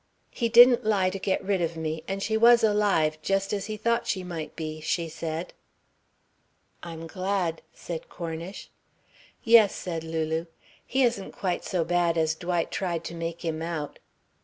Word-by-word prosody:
"He 235 -2 -1
didn't 240 +1 +8
lie 200 -4 +2
to 195 - -5
get 190 0 -1
rid 195 -2 +1
of 165 -1 -2
me 160 0 -3
and 195 0 -3
she 220 - 0
was 235 +1 +6
alive, 200 -8 +2
just 195 +4 0
as 200 -1 -2
he 215 -1 -4
thought 235 +2 0
she 185 - -1
might 170 -4 -6
be," 155 -1 -5
she 165 +2 -1
said. 160 +1 -5 1.3
"I'm 165 -1 -7
glad," 185 -1 -2
said 165 -2 -7
Cornish. 170 +2 -7 0.7
"Yes," 225 -4 +6
said 165 -3 -4
Lulu. 160 0 -2 0.4
"He 265 +1 +2
isn't 230 -6 0
quite 185 -3 -2
so 175 -3 -1
bad 175 -1 +1
as 160 -1 +2
Dwight 175 0 -2
tried 170 -3 -2
to - - -6
make 170 +1 -5
him 160 -1 -2
out." 160 -3 -4
175 Hz, 165 wpm, -27 LUFS, 165-200 Hz, 1.3 s, didn't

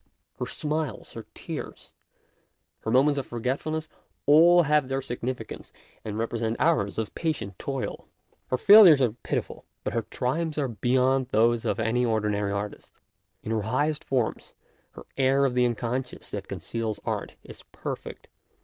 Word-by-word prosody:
Her - - -2
smiles, 150 -1 -3
her - - -9
tears, - - -7 0.9
her - - -5
moments 140 +4 +4
of 135 - -6
forgetfulness, 140 +7 -2 0.4
all 170 +4 +7
have 150 -2 +2
their 135 0 -1
significance 125 -1 -5 0.3
and 105 -1 -5
represent 115 0 -2
hours 150 -12 +1
of 110 -2 -3
patient 145 - -3
toil. 135 -2 -4 0.4
Her 130 - 0
failures 195 - +9
are 125 -4 +3
pitiful; 115 - -4 0.2
but - - -3
her - - +1
triumphs 155 +5 -2
are 140 -3 0
beyond 130 +4 +1
those 115 +1 +2
of 105 -1 0
any 115 +2 +1
ordinary 105 -3 0
artist. 100 +1 -6 0.4
In 110 - -4
her 110 -1 0
highest 145 +8 0
forms 125 -4 -2 0.4
her - - -11
air 135 +1 +3
of 130 - 0
the 125 0 +3
unconsciousness 120 +2 -4
that - - -5
conceals 115 -2 -4
art - - -3
is - - -12
perfect. - - -7
125 Hz, 150 wpm, -26 LUFS, 115-145 Hz, 0.9 s, failures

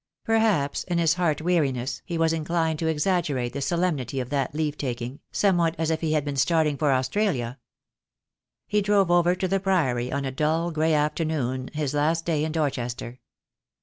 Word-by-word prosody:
Perhaps 220 -11 +1
in 175 -1 -1
his 165 -1 +3
heart 170 -4 0
weariness 135 -8 0
he 170 - -3
was 165 0 +2
inclined 160 -1 -1
to 160 - -1
exaggerate 150 -6 0
the 140 - -4
solemnity 150 -6 -1
of 125 +1 -5
that 140 0 -1
leave 150 -1 -1
taking, 125 -1 -4
somewhat 175 -5 +2
as 160 0 0
if 160 - -1
he 160 -2 0
had 150 -2 +1
been 145 -1 -3
starting 150 +2 +2
for 145 0 +1
Australia. 130 - 0 1.1
He 210 0 +1
drove 200 -3 +3
over 175 0 +4
to 185 +1 -1
the 195 +2 +1
Priory 135 -11 0
on 140 0 -2
a 135 - -2
dull, 160 +5 0
grey 160 0 +2
afternoon, 150 -4 -1
his 150 -2 -1
last 160 +3 +1
day 155 -3 0
in 155 - -1
Dorchester. 125 -5 -3
155 Hz, 180 wpm, -25 LUFS, 135-170 Hz, 1.1 s, over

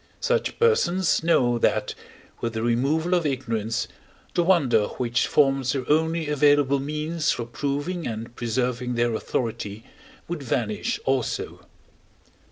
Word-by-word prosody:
Such 485 0 0
persons 190 - +2
know 125 -8 +3
that, - - +1 0.5
with 115 -1 -3
the 110 0 -2
removal 140 +9 +1
of 175 -2 +3
ignorance, 115 -6 -2 0.5
the - - +2
wonder 145 - +3
which 120 -2 0
forms 135 -3 +2
their 130 -3 -3
only 160 +1 +1
available 145 -1 +3
means 155 +3 -2
for 120 - 0
proving 145 +8 -3
and 115 +1 -6
preserving 125 +1 -1
their 120 0 +1
authority 110 -2 -3 0.4
would 175 -3 -4
vanish 115 -5 -1
also. 135 -2 -2
135 Hz, 125 wpm, -24 LUFS, 120-155 Hz, 0.5 s, know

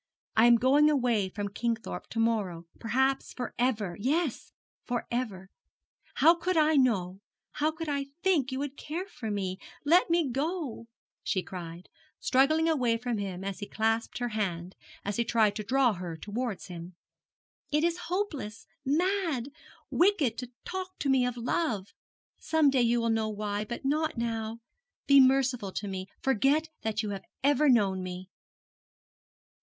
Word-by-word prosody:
I 225 +2 +6
am 240 - +8
going 275 +5 +5
away 240 -9 +2
from 205 +1 -4
Kingthorpe 230 0 -3
to - - -8
morrow, 205 -7 0
perhaps 265 +4 0
for 250 - -5
ever. 215 -8 0
Yes, 285 +4 -1 0.3
for 240 -1 -2
ever. 205 -6 -3 0.6
How 330 +2 +7
could 345 +1 -1
I 310 0 +4
know, 195 -9 +2 0.3
how 300 +1 +1
could 320 +1 -5
I 280 -1 -1 0.2
think 315 -9 +2
you 260 - -2
would 285 0 -4
care 335 +5 -4
for 250 - -7
me? 190 -2 -2 0.3
Let 340 +5 +5
me 335 -3 +3
go!' 275 -2 -3 0.3
she 185 -4 -1
cried, 175 -1 -8 0.3
struggling 310 +5 +3
away 250 -8 +2
from 240 -2 -2
him 190 -2 -4
as 195 -1 -4
he 205 - -5
clasped 225 +1 0
her 245 -1 -2
hand, 185 -5 -3 0.3
as 205 0 -2
he 235 - +2
tried 220 -3 +2
to 215 - -3
draw 255 +1 +3
her 175 -3 -6
towards 215 +3 -4
him. 175 0 -9 0.7
'It 300 +1 +1
is 340 0 +1
hopeless, 315 - -3 0.2
mad, 320 -3 0 0.4
wicked 350 - +3
to 250 -1 -6 0.2
talk 375 0 -5
to 280 - -1
me 255 -2 +3
of 245 -1 -4
love: 230 - -1 0.5
some 315 -3 +3
day 265 -2 +3
you 240 0 +3
will 230 0 +1
know 220 -1 +1
why, 210 -1 -2
but 240 +5 -6
not 305 0 0
now. 225 -1 -3 0.4
Be 280 0 +7
merciful 260 -5 +3
to 205 - -3
me; 190 -1 -4 0.2
forget 270 +5 +2
that 220 0 -1
you 210 - -3
have 195 -1 -6 0.2
ever 290 +1 +4
known 200 -6 +3
me.' 185 +1 -7
240 Hz, 160 wpm, -29 LUFS, 205-290 Hz, 0.7 s, am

